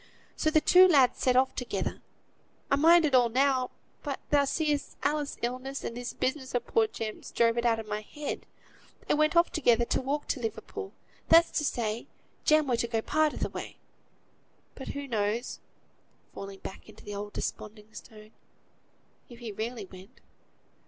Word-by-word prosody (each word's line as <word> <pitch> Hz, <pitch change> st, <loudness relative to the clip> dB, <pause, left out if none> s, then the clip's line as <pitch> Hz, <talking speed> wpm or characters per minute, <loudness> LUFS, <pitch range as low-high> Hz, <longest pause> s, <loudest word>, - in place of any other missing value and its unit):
So 310 Hz, -, +1 dB
the 310 Hz, 0 st, +4 dB
two 365 Hz, +4 st, +7 dB
lads 275 Hz, -8 st, +4 dB
set 255 Hz, -1 st, +2 dB
off 260 Hz, +1 st, +3 dB
together. 250 Hz, -, -3 dB, 0.7 s
I -, -, +6 dB
mind 330 Hz, +3 st, +6 dB
it 290 Hz, -, 0 dB
all 245 Hz, -2 st, +5 dB
now; 260 Hz, +1 st, +2 dB, 0.3 s
but, 280 Hz, -3 st, -4 dB
thou 285 Hz, -1 st, +4 dB
seest, 295 Hz, 0 st, -1 dB
Alice's 295 Hz, 0 st, -1 dB
illness, 255 Hz, +3 st, -3 dB
and 230 Hz, -, -4 dB
this 245 Hz, 0 st, -4 dB
business 260 Hz, -1 st, -3 dB
of 245 Hz, -, 0 dB
poor 450 Hz, -1 st, +2 dB
Jem's, 225 Hz, -, -6 dB
drove 230 Hz, -1 st, +2 dB
it 240 Hz, 0 st, +1 dB
out 230 Hz, -1 st, +3 dB
of 225 Hz, -, -6 dB
my 210 Hz, 0 st, -3 dB
head; 295 Hz, +7 st, -6 dB, 0.6 s
they -, -, +1 dB
went 305 Hz, +2 st, +2 dB
off 340 Hz, +1 st, +4 dB
together, 240 Hz, -6 st, +3 dB
to -, -, 0 dB
walk 285 Hz, +3 st, -2 dB
to -, -, 0 dB
Liverpool; 320 Hz, -, -5 dB, 0.4 s
that's 335 Hz, +1 st, +7 dB
to -, -, -2 dB
say, 230 Hz, -4 st, -2 dB, 0.4 s
Jem 310 Hz, 0 st, +5 dB
were 250 Hz, -3 st, +1 dB
to 235 Hz, -, 0 dB
go 230 Hz, -1 st, -1 dB
a 220 Hz, -, -1 dB
part 310 Hz, -1 st, +1 dB
o' -, -, -6 dB
th' -, -, -3 dB
way. -, -, -7 dB, 1.0 s
But, 265 Hz, -, -9 dB
who 285 Hz, 0 st, -5 dB
knows" 220 Hz, 0 st, -1 dB, 0.7 s
(falling 195 Hz, 0 st, -8 dB
back -, -, -9 dB
into -, -, -15 dB
the 205 Hz, -, -6 dB
old 205 Hz, +1 st, -6 dB
desponding 210 Hz, 0 st, -6 dB
tone) 215 Hz, -1 st, -12 dB, 1.0 s
"if 240 Hz, -, -12 dB
he 235 Hz, -2 st, -6 dB
really 220 Hz, +1 st, -4 dB
went? 190 Hz, +5 st, -15 dB
255 Hz, 180 wpm, -29 LUFS, 225-295 Hz, 1.0 s, two